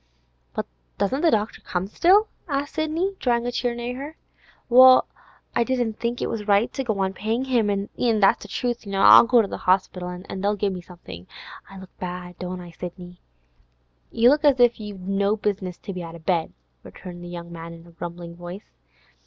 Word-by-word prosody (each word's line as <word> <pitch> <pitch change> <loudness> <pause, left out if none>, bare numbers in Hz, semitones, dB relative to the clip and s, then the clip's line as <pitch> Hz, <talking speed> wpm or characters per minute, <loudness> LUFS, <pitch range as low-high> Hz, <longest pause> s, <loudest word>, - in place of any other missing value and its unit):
'But - - -2 0.3
doesn't 205 +9 0
the 335 - +4
doctor 215 -5 -1
come 180 0 -3
still?' 375 - +4 0.2
asked 285 -1 -2
Sidney, 330 +5 -1
drawing 240 -2 +1
a 245 - -1
chair 245 0 -1
near 240 +1 -4
to 255 - -8
her. 295 +3 -8 0.5
'Well, 255 +1 +8 0.5
I 235 - +3
didn't 240 -3 -1
think 235 +1 -2
it - - 0
was 220 -2 -4
right 205 +3 +3
to 270 - -2
go 220 -5 -2
on 190 -1 0
payin' 225 +6 -2
him, 240 -5 +1
an' 200 0 -1 0.3
that's 195 - +4
the - - -9
truth. 240 +1 -3
I'll 195 +4 +8
go 240 -2 +5
to - - -3
the - - -7
Orspital, 185 -1 +1
an' 180 +1 -7
they'll 205 +1 +1
give 200 -1 -1
me 180 - -6
somethin'. 95 - -12 0.4
I 195 - -11
look 190 -1 -13
bad, 180 -1 -6
don't 180 0 -5
I, 175 -1 -11
Sidney?' 180 +1 -9 0.9
'You 235 +2 +4
look 295 +2 +2
as 280 -3 +4
if 240 -1 +4
you'd 200 -3 -8
no 200 +1 +1
business 200 -4 -3
to 200 - -7
be 180 - -5
out 165 -1 -8
of 165 -1 -14
bed,' 170 -4 0 0.3
returned 175 - -10
the - - -8
young 170 -1 -8
man 165 0 -8
in 165 0 -12
a 170 - -16
grumbling 170 0 -8
voice. 175 +4 -10
200 Hz, 205 wpm, -24 LUFS, 180-240 Hz, 0.9 s, Well